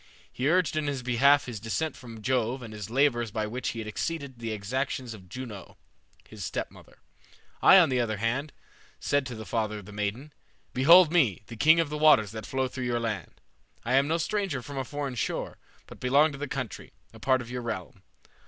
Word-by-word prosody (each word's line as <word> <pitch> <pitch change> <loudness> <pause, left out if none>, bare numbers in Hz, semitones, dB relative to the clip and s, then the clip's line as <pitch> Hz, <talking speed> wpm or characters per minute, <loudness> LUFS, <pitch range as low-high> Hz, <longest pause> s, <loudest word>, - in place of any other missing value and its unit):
He 130 +3 0
urged 180 -1 +2
in 155 -1 -1
his 140 -3 -2
behalf 135 +3 +4
his 120 -4 -6
descent 135 +9 -2
from 115 -4 -11
Jove 125 0 0
and 110 -2 -8
his 105 -1 -7
labors 120 -2 +2
by 110 +1 -2
which 125 +4 -3
he - - -5
had 110 -1 -5
exceeded 140 +2 -4
the 115 -1 -4
exactions 125 +3 -3
of 95 -4 -13
Juno, 110 -4 -8 0.5
his - - -9
stepmother. - - -6 0.6
I, 195 - +8
on 175 -5 +6
the 130 -1 +1
other 110 -3 -1
hand, 125 +8 -1 0.5
said 145 -2 0
to 125 - -6
the 110 0 -8
father 110 -2 -2
of 105 - -10
the 105 - -11
maiden, 105 +8 -4 0.4
'Behold 165 +6 +7
me, 130 - +2
the 115 - -9
king 160 +8 +5
of 165 -3 +1
the 150 - -3
waters 130 -10 +5
that 110 -1 -7
flow 130 0 -1
through 130 0 -5
your 120 -1 0
land. 110 -6 -4 0.5
I 120 - 0
am 135 +2 +4
no 165 +2 +1
stranger 175 - -2
from 140 0 -6
a - - -1
foreign 140 0 -4
shore, 110 -3 -3 0.3
but - - -13
belong 140 +5 +4
to 140 - -9
the 145 - -3
country, 130 -6 -6 0.2
a - - -13
part 130 -1 +2
of 120 0 -9
your 125 0 -3
realm. 95 -7 -6
125 Hz, 210 wpm, -28 LUFS, 110-145 Hz, 0.6 s, I